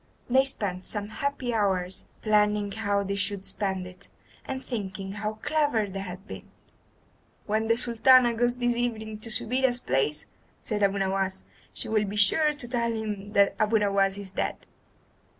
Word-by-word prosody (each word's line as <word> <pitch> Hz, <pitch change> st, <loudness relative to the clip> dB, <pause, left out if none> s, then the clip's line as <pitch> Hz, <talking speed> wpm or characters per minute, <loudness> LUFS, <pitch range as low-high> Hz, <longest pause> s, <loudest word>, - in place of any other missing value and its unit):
They 265 Hz, +1 st, +5 dB
spent 190 Hz, -8 st, -2 dB
some 205 Hz, -1 st, -3 dB
happy 260 Hz, 0 st, -2 dB
hours 190 Hz, -4 st, 0 dB, 0.2 s
planning 210 Hz, -1 st, +2 dB
how 205 Hz, -1 st, 0 dB
they 200 Hz, 0 st, -2 dB
should 200 Hz, -1 st, -2 dB
spend 190 Hz, -2 st, -2 dB
it, 185 Hz, +2 st, -10 dB, 0.4 s
and 265 Hz, 0 st, -5 dB
thinking 195 Hz, -5 st, -4 dB
how 210 Hz, +1 st, -3 dB
clever 290 Hz, -8 st, +2 dB
they 195 Hz, -1 st, -6 dB
had 190 Hz, 0 st, -7 dB
been. -, -, -9 dB, 1.0 s
"When 220 Hz, +1 st, 0 dB
the 230 Hz, 0 st, +3 dB
Sultan 240 Hz, +1 st, +5 dB
goes 240 Hz, +1 st, +1 dB
this 245 Hz, -1 st, +1 dB
evening 220 Hz, -3 st, -2 dB
to 230 Hz, -, -5 dB
Subida's 250 Hz, +3 st, +2 dB
palace," 150 Hz, -, 0 dB, 0.3 s
said 210 Hz, -1 st, -2 dB
Abu 200 Hz, 0 st, +3 dB
Nowas, 190 Hz, 0 st, -1 dB, 0.3 s
"she -, -, -4 dB
will 215 Hz, -1 st, +2 dB
be 200 Hz, +1 st, -5 dB
sure 255 Hz, +10 st, +4 dB
to 290 Hz, -5 st, -4 dB
tell 235 Hz, -1 st, 0 dB
him 210 Hz, -3 st, -4 dB
that 200 Hz, -1 st, +4 dB
Abu 215 Hz, +1 st, +3 dB
Nowas 200 Hz, -1 st, +2 dB
is 200 Hz, -2 st, -8 dB
dead. -, -, -3 dB
210 Hz, 165 wpm, -27 LUFS, 195-235 Hz, 1.0 s, They